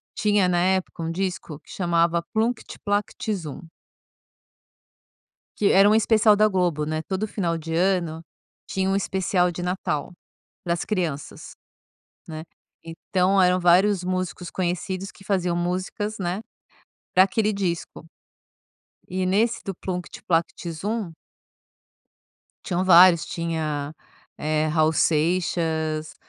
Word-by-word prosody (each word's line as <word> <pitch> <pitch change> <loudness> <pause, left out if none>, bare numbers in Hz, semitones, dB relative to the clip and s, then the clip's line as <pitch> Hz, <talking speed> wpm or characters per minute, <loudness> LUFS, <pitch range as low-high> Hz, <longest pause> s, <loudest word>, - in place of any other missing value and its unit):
tinha 205 -3 +2
na 175 -1 +2
época, 185 -2 0
um 165 - -2
disco 180 -4 -4
que - - -17
chamava 170 -1 +1
Plunct 225 +1 -1
Plact 205 +1 -1
Zum 165 -8 -6 2.0
que 205 - +3
era 195 +2 +6
um 215 - +4
especial 220 -1 +4
da 215 +1 +4
Globo, 175 -6 0
né, 155 0 -2
todo 195 +3 -2
final 170 -5 -2
de 165 0 -6
ano 170 -3 0 0.5
tinha 190 0 0
um 195 - +1
especial 185 -2 +1
de 175 - -6
Natal, 180 -2 -2 0.5
para 170 - 0
as 175 - -4
crianças, 170 -9 -4 0.8
né, 155 -1 -6 0.4
então 185 +3 0
eram 180 0 +4
vários 180 +2 +4
músicos 185 -1 -3
conhecidos 185 +1 -3
que - - -17
faziam 180 -3 0
músicas, 185 +5 -2
né, 185 +1 -2 0.7
para 185 - +7
aquele 210 +2 0
disco. 180 -6 -3 1.0
E 185 +1 -2
nesse 220 +5 +1
do 195 - -3
Plunct 180 0 -6
Plact 170 0 -1
Zum 200 +2 -3 1.5
tinham 180 -1 -1
vários, 180 -2 +7
tinha, 155 -3 -3 0.4
eh, 155 0 0
Raul 155 0 +2
Seixas, 160 -1 0
180 Hz, 125 wpm, -24 LUFS, 165-195 Hz, 2.0 s, para